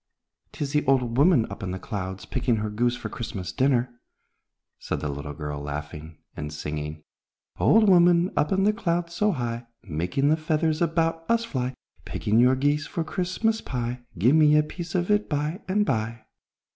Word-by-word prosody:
"'Tis 140 -2 -3
the 150 - +2
old 125 -4 +2
woman 145 -3 +5
up 100 - -7
in 95 - -3
the 95 - -3
clouds, 95 -1 -5
picking 120 -3 0
her 105 -1 -2
goose 120 +3 +1
for - - -5
Christmas 95 -6 -5
dinner," 125 +1 +1 0.8
said - - -3
the 75 - -3
little 70 +1 -5
girl, 75 -2 -5
laughing 75 +2 -6 0.2
and 75 0 -5
singing, 75 0 -5 0.6
"Old 220 0 +5
woman, 175 -1 +5
up 150 0 +1
in 190 0 +2
the 210 +1 +4
clouds 170 -5 -1
so 210 +4 +2
high, 120 -5 -3 0.2
Making 90 - 0
the 155 - +3
feathers 155 0 0
about 165 0 +1
us 230 0 +2
fly, 130 - -3 0.3
Picking 110 +2 0
your 125 +2 +5
geese 145 +3 +1
for 170 -5 -2
Christmas 190 +7 -1
pie, 125 -1 -4 0.2
Give 120 - +4
me 150 -1 +6
a 150 - +5
piece 175 +3 -7
of 180 +2 +1
it 210 0 +2
by 150 +5 -2
and 205 +2 +2
by!" 110 - -2
135 Hz, 180 wpm, -25 LUFS, 105-170 Hz, 0.8 s, me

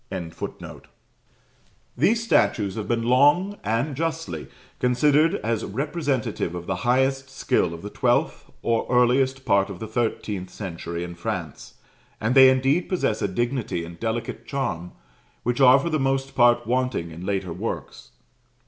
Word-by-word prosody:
] - - -42 1.9
These 220 - +2
statues 105 - +2
have 110 -2 -5
been 115 -1 0
long, 145 - +3
and 115 +7 -1
justly, 160 - -3 0.3
considered 145 +6 +3
as 115 0 -1
representative 135 - -2
of 85 -1 -6
the 95 - -2
highest 130 +4 +1
skill 130 -9 0
of 85 +1 -8
the 105 - -6
twelfth - - 0
or 115 -1 0
earliest 130 +2 +2
part 100 -3 +3
of 100 - -7
the 110 - -6
thirteenth 105 -4 -2
century 85 -3 -6
in 90 0 -6
France; 85 -4 -6 0.4
and 110 +3 0
they 130 -1 +9
indeed 135 +6 +1
possess 170 - 0
a - - +1
dignity 120 -4 -2
and 85 0 -11
delicate 115 0 -4
charm, 105 - -3 0.5
which 120 +3 -1
are 130 0 +8
for 165 +5 -2
the 155 - +1
most 135 0 0
part 120 -1 +4
wanting 125 -8 -1
in 85 +2 -9
later 95 -3 -2
works. 105 +7 -6
120 Hz, 150 wpm, -24 LUFS, 100-135 Hz, 1.9 s, they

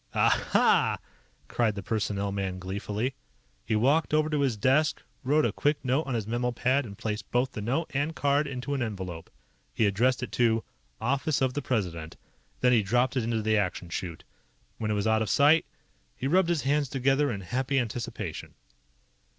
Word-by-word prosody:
"Aha!" - - +3 0.5
cried 110 -4 0
the 100 - -5
personnel 100 -1 -1
man 95 -2 -3
gleefully. 100 +6 -3 0.5
He 110 - -1
walked 145 +8 +2
over 155 0 +2
to 150 -1 +1
his 130 -6 +1
desk, 135 +8 +2 0.2
wrote 150 +4 +3
a - - +1
quick 145 -1 0
note 130 +5 +1
on 130 - -1
his 110 -3 -2
memo 120 +3 -1
pad, 130 +2 +1
and 100 -1 -10
placed 105 -1 -4
both 125 +2 0
note 125 +10 -2
and 145 +4 -1
card 145 +1 +2
into 135 +1 -4
an 135 - -1
envelope. 95 -7 -5 0.5
He 110 - +3
addressed 120 +6 +2
it - - -5
to: 115 -2 +2 0.4
OFFICE 140 +5 0
OF 130 -1 +1
THE 145 - -2
PRESIDENT. 90 - -3 0.4
Then 125 0 +4
he 115 - +5
dropped 120 +6 +1
it 130 - +1
into 115 -1 -1
the 110 0 +2
Action 90 -3 -2
Chute. 85 -1 -5 0.6
When 110 - -2
it 105 - +1
was 100 0 -1
out 110 0 +3
of 110 - -1
sight, 150 +3 +5 0.5
he - - -5
rubbed 175 +5 +3
his 170 -4 +1
hands 145 0 +1
together 135 +2 +2
in 100 -3 -4
happy 130 +9 -1
anticipation. 120 -2 -4
125 Hz, 185 wpm, -28 LUFS, 105-140 Hz, 0.6 s, he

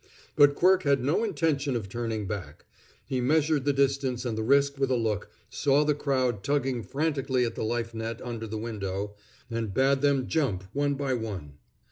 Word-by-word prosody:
But 145 0 +6
Quirk 185 +3 +4
had 140 -6 +2
no 150 - +1
intention 145 - 0
of 110 -5 -3
turning 110 0 -3
back. 95 -7 -6 0.4
He 130 -2 -1
measured 150 +1 +2
the 145 - +4
distance 135 -2 0
and 115 -3 -1
the 110 - -2
risk 140 +4 +3
with 135 -1 +1
a 130 - +2
look, 110 -3 -1 0.2
saw 145 +1 +2
the 150 0 +2
crowd 130 -7 0
tugging 135 -4 0
frantically 135 -1 0
at 115 - -3
the - - -4
life 115 +1 -2
net 115 0 -4
under 115 -2 -5
the 110 +1 -4
window, 100 -2 -4 0.4
and 115 -3 -2
bade 135 +1 +3
them 140 -3 +2
jump, 130 - 0
one 145 0 +1
by 135 -1 -1
one. 95 - -5
130 Hz, 185 wpm, -28 LUFS, 110-140 Hz, 0.4 s, But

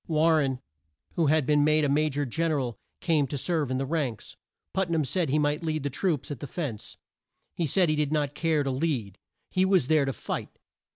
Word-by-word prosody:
War 160 0 +3
ren, 135 -4 0 0.5
who 165 -3 +1
had 155 -1 +3
been 150 +1 +3
made 155 0 +3
a - - +2
Ma 150 +2 +2
jor 145 0 -2
Gen 160 +6 -1
er 150 - +1
al, 120 -5 -4 0.2
came 155 -5 +2
to 145 - -3
serve 155 -1 0
in 130 - -1
the 135 - -1
ranks. 140 -6 -3 0.4
Put 190 -2 0
nam 160 -3 +1
said 170 +2 0
he 145 - +2
might 150 +1 +1
lead 155 -2 -2
the 140 - -2
troops 155 -2 -1
at 140 - -5
the 145 - -6
fence. 135 -8 -5 0.6
He 170 - -1
said 180 +5 +3
he 155 - +2
did 150 -1 0
not 145 -2 0
care 155 -1 +1
to 135 - -1
lead; 130 - -2 0.3
he 185 - +2
was 190 -6 +3
there 155 -3 +4
to 135 - -2
fight. - - -5
150 Hz, 230 wpm, -27 LUFS, 135-160 Hz, 0.6 s, there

